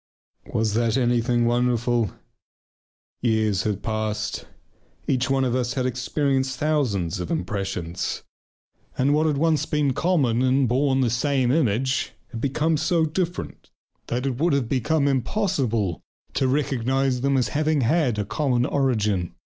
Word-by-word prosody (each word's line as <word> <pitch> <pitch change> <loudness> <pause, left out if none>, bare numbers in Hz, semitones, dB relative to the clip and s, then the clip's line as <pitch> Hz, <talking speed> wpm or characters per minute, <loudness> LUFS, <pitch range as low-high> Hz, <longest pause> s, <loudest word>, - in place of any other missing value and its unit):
Was 110 -1 0
that 115 +1 +1
anything 120 -1 +2
wonderful? 120 -2 +1 1.1
Years 110 -5 +1
had 105 -1 -2
passed. 110 -1 -3 0.6
Each 130 0 0
one 135 0 +2
of 125 -2 0
us 125 +1 -1
had 130 -2 0
experienced 130 +1 -1
thousands 120 - 0
of 90 - -4
impressions, 95 - -3 0.7
and 135 +3 +2
what 155 +2 +2
had 150 -2 +1
once 160 0 +1
been 150 -3 +1
common 135 -8 +1
and 130 +1 +3
had 130 - +2
borne 135 +1 +2
the 120 -3 +1
same 130 0 +1
image 130 -2 +1 0.2
had 115 -2 -6
become 150 +4 +1
so 160 +1 +2
different 175 +3 -4 0.4
that 125 +3 -2
it 130 -2 -2
would 165 0 +2
have 140 -4 +1
been 145 +4 +1
impossible 125 - 0 0.3
to 135 - +1
recognize 135 -1 0
them 140 0 +2
as 125 - +1
having 155 -1 +1
had 125 -2 +2
a 105 - -1
common 125 +2 0
origin. 105 -11 0
130 Hz, 145 wpm, -24 LUFS, 115-140 Hz, 1.1 s, and